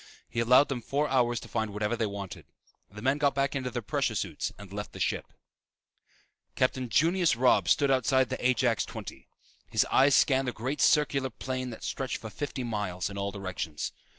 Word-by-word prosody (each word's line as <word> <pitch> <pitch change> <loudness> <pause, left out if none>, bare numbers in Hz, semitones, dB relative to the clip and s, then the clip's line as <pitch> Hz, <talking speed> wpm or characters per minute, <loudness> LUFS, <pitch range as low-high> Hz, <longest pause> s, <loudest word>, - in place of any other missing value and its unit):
He - - -4
allowed 125 +5 +6
them 130 -3 -2
four 145 +6 0
hours 120 -2 +2
to - - -10
find 110 -2 -2
whatever 105 +3 -1
they 115 -2 0
wanted. 100 -2 -7 0.4
The 105 +2 -10
men 135 +3 +2
got 145 -1 +2
back 140 +1 0
into 130 -2 -2
their 120 -2 -4
pressure - - -1
suits - - -2
and 100 -2 -11
left 105 +1 -6
the - - -9
ship. - - -1 1.3
Captain 130 -1 0
Junius 165 +2 +3
Robb 125 +1 +3
stood 140 -2 +4
outside 130 0 +3
the 130 - -4
Ajax 125 -2 +2
XX. - - -9 0.4
His - - +2
eyes 135 +1 +5
scanned 135 -1 +3
the 125 - -1
great 130 +6 -3
circular 140 -3 +3
plain 130 +1 -4
that 115 - -9
stretched 135 -2 -3
for 110 - -9
fifty 140 -1 -4
miles 105 -5 -3
in 100 - -7
all 100 0 -1
directions. 95 -6 -4
125 Hz, 190 wpm, -29 LUFS, 105-135 Hz, 1.3 s, allowed